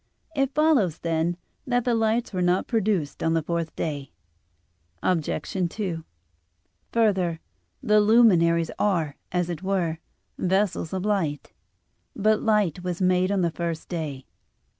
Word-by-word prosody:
It 275 -1 0
follows, 285 - +3
then, 165 +1 -1 0.3
that 245 -1 +1
the 245 - +2
lights 225 0 +1
were 185 - -1
not 180 +1 +2
produced 205 -9 -1
on 165 0 +1
the 165 - +1
fourth 170 0 -3
day. 145 -4 -4 0.9
Obj. 165 -5 +1 0.4
2: 175 -5 -4 0.9
Further, 190 -7 +1 0.4
the 210 -3 +4
luminaries 175 -7 +4
are, 165 -8 +1 0.2
as 180 -1 0
it 175 -1 -5
were, 180 -4 -1 0.4
vessels 190 -3 0
of 190 0 -3
light. 175 -9 -1 0.6
But 215 +1 +2
light 210 -6 +1
was 180 -1 -3
made 185 0 +2
on 200 -2 +1
the 170 -1 +1
first 170 -1 -4
day. 150 -6 -4
180 Hz, 135 wpm, -25 LUFS, 165-210 Hz, 0.9 s, the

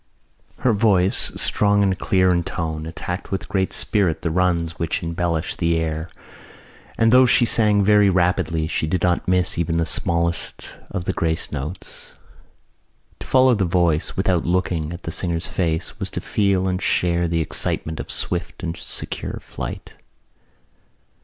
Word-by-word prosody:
Her 125 - +3
voice, 100 -3 +3
strong 100 -1 +3
and 95 -1 +1
clear 95 -1 +2
in 85 -1 +2
tone, 80 -2 -4
attacked 90 +2 -6
with 95 -4 -4
great 95 -1 -1
spirit 90 -7 0
the 85 - -1
runs 85 -1 0
which 85 - -2
embellish 85 +1 -2
the 85 -1 0
air 80 0 -3 0.9
and 115 0 +3
though 130 +1 +6
she 120 - +5
sang 105 -3 +3
very 105 0 +5
rapidly 90 -3 +1
she 80 -1 -2
did 90 +2 -1
not 90 -1 +1
miss 90 -2 +3
even 85 0 0
the 85 - +1
smallest 85 +2 -1
of 90 - -4
the - - -1
grace 80 -1 -2
notes. 80 +7 -7 1.1
To - - -8
follow 130 -1 +5
the 105 -4 +1
voice, 85 -2 +1
without 95 -3 +1
looking 85 -3 -1
at 85 +1 -8
the 80 - -4
singer's 85 -1 -1
face, 80 -2 -2
was - - -3
to - - -4
feel 100 -2 0
and 90 0 -2
share 85 -2 +1
the 85 0 0
excitement 80 0 -1
of - - -6
swift - - -3
and 85 0 -3
secure - - -3
flight. - - -8
90 Hz, 160 wpm, -21 LUFS, 85-95 Hz, 1.1 s, though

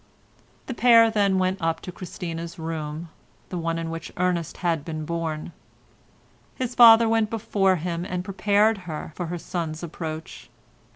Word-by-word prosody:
The 260 - -4
pair 230 -1 +6
then 200 -3 +2
went 185 +1 0
upstairs 165 0 0
to 180 - -6
Christina's 170 -2 -6
room, 160 0 -5 0.4
the 180 - -4
one 165 0 -1
in 165 0 -4
which 165 0 -6
Ernest 175 -2 -1
had 165 -4 +1
been 155 -1 -5
born. 165 -1 -3 1.0
His 255 -1 -3
father 230 -1 +8
went 225 -1 +2
before 200 -4 +1
him 170 0 -3
and 180 -1 -4
prepared 205 +3 +2
her 155 0 -5
for 175 - -4
her 175 +2 -4
son's 165 -1 -4
approach. 160 -1 -7
175 Hz, 155 wpm, -25 LUFS, 165-200 Hz, 1.0 s, father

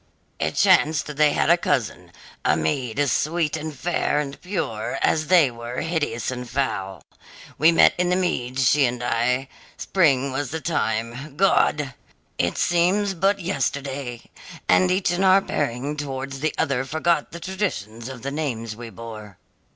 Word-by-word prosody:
"It - - -1
chanced 150 -1 +3
they 150 0 +4
had - - +2
a - - +6
cousin - - -1 0.3
a 75 - +3
maid 110 - -1
as 145 -3 +2
sweet 160 0 0
and 155 0 -4
fair 150 +1 -1
and 140 -1 -5
pure 145 - -3
as 155 -1 +2
they 165 -7 +5
were 120 +1 -5
hideous 145 -9 -2
and 125 -1 -6
foul. 95 -8 -2 0.6
We 160 +2 +6
met 165 - +6
in 180 0 +2
the 180 - +3
meads 130 -8 0
she 145 +1 +4
and 120 0 -4
I. 125 +2 0 0.3
Spring 140 -7 +2
was 140 +2 -2
the 160 - -4
time 125 -2 -2
God! 150 -7 +2 0.5
It 85 - 0
seems 185 +3 +2
but 195 +3 +1
yesterday! 140 -6 -3 0.4
and 185 - +4
each 185 -1 +1
in 175 +2 0
our 190 0 +6
bearing 145 -5 -2
towards 135 -1 -5
the 155 +2 -1
other 135 -2 0
forgot 160 +2 0
the 170 - -8
traditions 135 - -4
of 125 -3 -9
the 140 - -3
names 120 -7 -3
we 120 0 -8
bore. 105 -3 -10
140 Hz, 160 wpm, -23 LUFS, 120-165 Hz, 0.6 s, a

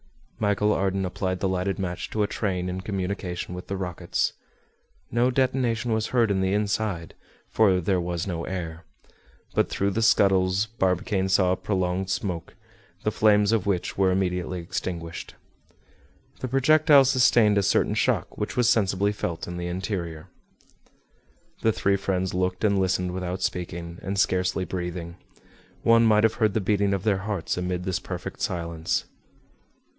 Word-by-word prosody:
Michel 105 0 +2
Ardan 95 0 0
applied 95 0 -2
the 95 - 0
lighted 95 +1 -1
match 90 -3 -4
to 105 - 0
a - - +1
train 90 -5 -2
in 90 +1 -3
communication 95 -3 -4
with 90 +1 -7
the 100 - -3
rockets. 90 -3 -2 0.8
No 120 +2 +3
detonation 125 -3 +1
was 110 0 0
heard 115 -4 +2
in 95 -1 +1
the 95 0 +1
inside, 100 -4 -1 0.3
for 100 -4 +3
there 90 +1 +1
was 85 -1 -3
no 85 -4 -3
air. 85 -2 -5 0.7
But, - - +2
through 100 +1 0
the 115 - -1
scuttles, 95 -2 +3
Barbicane 95 -2 0
saw 95 -1 +3
a - - +2
prolonged 95 -1 -1
smoke, 95 -3 -3 0.5
the - - +1
flames 105 -1 +4
of 110 -3 +1
which 95 -3 -1
were 95 -1 +4
immediately 90 -1 -1
extinguished. 85 -1 -5 1.0
The 130 - -3
projectile 140 +2 +5
sustained 120 -5 +4
a - - +2
certain 100 - +2
shock, - - 0
which - - -4
was 125 -2 +3
sensibly 100 -2 +2
felt 85 -5 -4
in 85 0 -5
the 85 0 -3
interior. 90 -3 -4 1.3
The 110 - +3
three 100 -2 +1
friends 95 -1 -1
looked 90 +1 -1
and 100 -2 +3
listened 90 -1 0
without 90 0 -4
speaking, 85 -1 -4
and 100 +1 -3
scarcely 95 -1 +1
breathing. 90 -1 -5 0.7
One 115 0 +5
might 105 -1 +4
have 110 -1 +4
heard 110 -2 +3
the - - +3
beating 100 0 +1
of 95 - -4
their 105 -3 +2
hearts 100 -3 -2
amid 90 0 -2
this 95 -1 -1
perfect - - -7
silence. 85 -2 -2
95 Hz, 160 wpm, -25 LUFS, 90-105 Hz, 1.3 s, projectile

